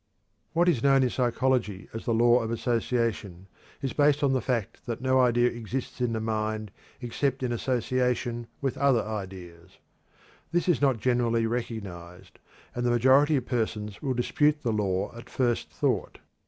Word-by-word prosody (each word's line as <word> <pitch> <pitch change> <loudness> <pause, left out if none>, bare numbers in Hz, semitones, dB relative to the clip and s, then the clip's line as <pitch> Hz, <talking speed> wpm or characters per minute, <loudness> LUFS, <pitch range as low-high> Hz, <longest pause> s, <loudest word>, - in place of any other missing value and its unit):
What 170 +2 +3
is 150 -10 +3
known 135 0 +4
in 125 - +1
psychology 125 -5 0
as 115 - -6
the 115 - +1
Law 120 +1 +5
of 115 - -3
Association 115 -5 -1 0.4
is 135 - -2
based 145 0 +3
on 135 -1 +3
the 130 - +1
fact 115 -3 -2
that 115 -1 -3
no 130 +1 +2
idea 120 -1 +3
exists 120 +3 -5
in 120 -2 +1
the 110 - -1
mind 110 -1 -2 0.3
except 130 +2 -1
in 125 - -1
association 125 -1 -1
with 135 -2 -2
other 135 -5 +3
ideas. 95 -4 -8 0.7
This 175 +1 0
is 175 - +2
not 135 -4 +3
generally 115 0 +1
recognized, 100 -7 -6 0.3
and 120 - -3
the 120 - +2
majority 130 +5 +4
of 130 -3 -1
persons 110 -4 -3
will 135 -3 -1
dispute 150 +4 +1
the 115 -3 0
law 100 0 -1
at 120 +1 -11
first 120 -11 0
thought. 75 - -1
120 Hz, 165 wpm, -27 LUFS, 110-130 Hz, 0.7 s, Law